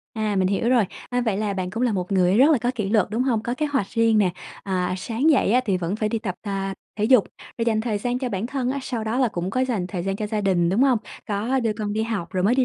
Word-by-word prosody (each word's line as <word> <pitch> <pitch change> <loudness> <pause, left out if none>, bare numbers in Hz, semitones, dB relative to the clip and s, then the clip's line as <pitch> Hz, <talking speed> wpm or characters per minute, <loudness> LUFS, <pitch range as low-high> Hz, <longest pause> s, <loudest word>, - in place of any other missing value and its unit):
À, 215 -2 -1
mình 185 -1 +2
hiểu 200 +4 0
rồi. 245 -4 +4 0.3
A, 245 0 +1
vậy 220 -5 0
là 205 -1 -1
bạn 185 -1 -3
cũng 225 +5 -3
là 245 -3 +2
một 185 0 -2
người 185 0 +3
rất 275 +5 +6
là 290 - +3
có 240 +2 0
kỷ 210 -5 -2
luật, 215 -2 +3
đúng 225 +4 0
hông? 240 -5 +1
Có 240 +2 -2
kế 305 - 0
hoạch 275 -8 0
riêng 225 -1 +3
nè, 190 -3 +3 0.3
à, 185 -2 -1
sáng 235 +10 +1
dậy 265 -8 +3
á 250 - +5
thì 195 -5 +1
vẫn 180 +2 -2
phải 215 -1 0
đi 225 +1 -1
tập 195 -5 -4
ta 195 -2 -3 0.2
thể 210 - +1
dục, 235 -2 +5 0.3
rồi 230 - +1
dành 220 -2 +1
thời 220 -2 -1
gian 245 +4 -1
cho 255 - -2
bản 205 -1 -2
thân 260 -1 -2
á, 280 - -2
sau 235 -4 -3
đó 225 +4 -1
là 255 - +3
cũng 180 -2 -3
có 255 - 0
dành 225 -8 -1
thời 180 -2 -4
gian 195 +1 -2
cho 210 - -3
gia 210 0 -2
đình, 180 -4 +2
đúng 200 +8 +2
hông? 265 -4 +4 0.3
Có 220 +6 0
đưa 225 -3 0
con 210 -1 -4
đi 220 +1 0
học 210 -6 -3
rồi 185 - 0
mới 220 +5 +4
đi 260 0 +3
215 Hz, 310 wpm, -23 LUFS, 195-245 Hz, 0.3 s, rất